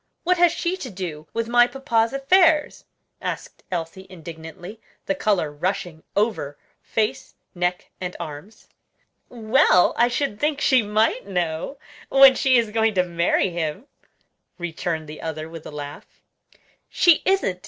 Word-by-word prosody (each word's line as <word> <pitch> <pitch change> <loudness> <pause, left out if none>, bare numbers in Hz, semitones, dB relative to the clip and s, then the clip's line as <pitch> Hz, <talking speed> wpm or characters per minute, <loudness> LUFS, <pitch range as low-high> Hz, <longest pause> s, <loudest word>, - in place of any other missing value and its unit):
what 360 0 +2
has 350 -1 +6
she 350 +1 -2
to 275 -9 -7
do 170 -6 -6
with 230 0 -2
my 240 +1 +5
papa's 235 -3 0
affairs?" 305 +3 +3 0.4
asked - - -5
Elsie 180 +2 -5
indignantly, 170 +4 -10 0.2
the - - 0
color 205 - 0
rushing 175 +1 -3
over 200 -10 -1 0.2
face, 215 -1 -2 0.2
neck, 180 0 -2
and 180 -1 -4
arms. 155 +8 -9 0.6
"Well, 230 -4 +3
I 240 - +5
should 245 -3 -2
think 295 -1 0
she 260 -3 +4
might 215 +2 0
know, 175 - -2 0.3
when 270 -1 +8
she 260 -1 +3
is 230 -3 +1
going 220 -1 +1
to 180 - +3
marry 175 +2 +1
him," 170 - -3 0.7
returned 165 -2 -4
the 150 +1 -9
other, 155 -1 -5
with 165 -1 -10
a - - -8
laugh. 145 -1 -9 0.7
"She 345 -3 +4
isn't! 380 - +1
200 Hz, 145 wpm, -23 LUFS, 165-255 Hz, 0.7 s, when